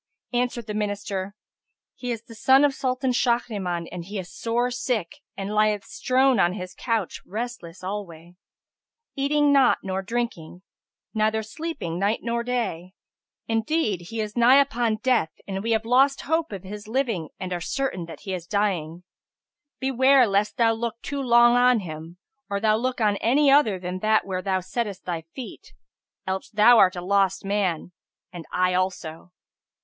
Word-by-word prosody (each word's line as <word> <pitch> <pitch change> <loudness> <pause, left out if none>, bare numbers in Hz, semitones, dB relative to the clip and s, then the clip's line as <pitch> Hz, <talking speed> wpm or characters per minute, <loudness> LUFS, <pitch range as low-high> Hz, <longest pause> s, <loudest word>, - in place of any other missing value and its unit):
Answered 245 -1 -1
the 210 - -5
Minister, 205 -2 -3 0.6
"He 250 - -7
is 230 -2 -3
the 230 - -13
son 265 +5 +5
of 285 - +1
Sultan 260 0 -1
Shahriman 210 -9 0
and 175 -1 -6
he 200 +4 -7
is 180 -2 -7
sore 240 +2 -1
sick 245 - -2 0.2
and 195 +1 -4
lieth 210 -1 +2
strown 260 -2 +2
on 175 -1 +3
his 185 -2 -7
couch 225 -6 -2
restless 210 -5 -6
alway, 180 -3 -6 0.8
eating 290 +1 +2
not 270 -2 +5
nor 190 0 -2
drinking 190 -6 -4 0.5
neither 220 0 +1
sleeping 220 - -5
night 205 +3 0
or 235 0 0
day; 225 -8 -3 0.5
indeed 225 - 0
he 225 - -5
is 210 0 -5
nigh 240 +2 +6
upon 240 -5 +1
death 245 -11 +2
and 195 -1 -3
we 225 - -3
have 225 -1 +1
lost 270 +4 +3
hope 320 -1 -1
of 195 -3 -6
his 205 +2 -8
living 225 - -1
and 185 -1 -4
are 175 - -3
certain 265 -5 -2
that 165 - -10
he 195 -2 -5
is 175 -2 -5
dying. 180 -5 -1 0.8
Beware 265 0 +4
lest 210 +2 0
thou 230 -2 +4
look 230 0 -4
too 280 0 -3
long 240 -1 +5
on 245 -2 +4
him, 165 0 -8 0.3
or 200 0 -1
thou 215 0 +3
look 250 +3 -2
on 210 -2 +2
any 275 +6 +3
other 250 -9 +4
than 180 0 -5
that 215 +2 +2
where 185 -1 -3
thou 190 -1 0
settest 200 0 -4
thy 170 -2 -3
feet: 255 - -9 0.5
else 190 0 -3
thou 220 +2 +6
art 185 0 +5
a 175 - -4
lost 195 0 +1
man, 190 -4 -1 0.4
and 170 -2 -9
I 180 0 +1
also." 180 -2 -3
215 Hz, 165 wpm, -24 LUFS, 185-245 Hz, 0.8 s, nigh